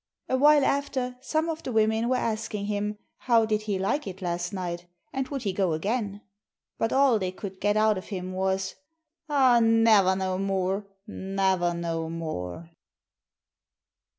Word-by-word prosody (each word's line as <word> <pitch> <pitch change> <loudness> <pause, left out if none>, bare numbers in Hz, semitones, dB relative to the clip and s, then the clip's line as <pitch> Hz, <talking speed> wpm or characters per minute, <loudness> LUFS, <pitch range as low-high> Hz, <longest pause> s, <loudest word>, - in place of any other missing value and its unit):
Awhile 290 +2 +5
after 265 -3 -1
some 315 +4 0
of 325 -1 -3
the 255 - -5
women 220 +1 +2
were 255 - +2
asking 220 -3 -2
him, 210 0 -2 0.2
how 230 -3 +3
did 215 -1 0
he 210 -2 -2
like 200 +8 -1
it 190 -1 -7
last 175 -1 -2
night, 175 -2 -4 0.3
and 265 -1 -2
would 275 -2 -4
he 195 -3 -1
go 185 -3 +1
again? 205 +4 -2 0.6
But 225 - 0
all 265 -4 +4
they 185 -2 -2
could 190 0 -8
get 205 +1 +2
out 215 -2 +3
of - - -12
him 185 -2 -5
was: 190 0 -1 0.6
'Aw, 260 -5 +5
naver 225 -4 +5
no 185 -1 -1
more, 195 +1 -1 0.2
naver 190 -3 0
no 165 -1 -3
more!' 160 - -5
205 Hz, 155 wpm, -27 LUFS, 185-230 Hz, 0.6 s, Awhile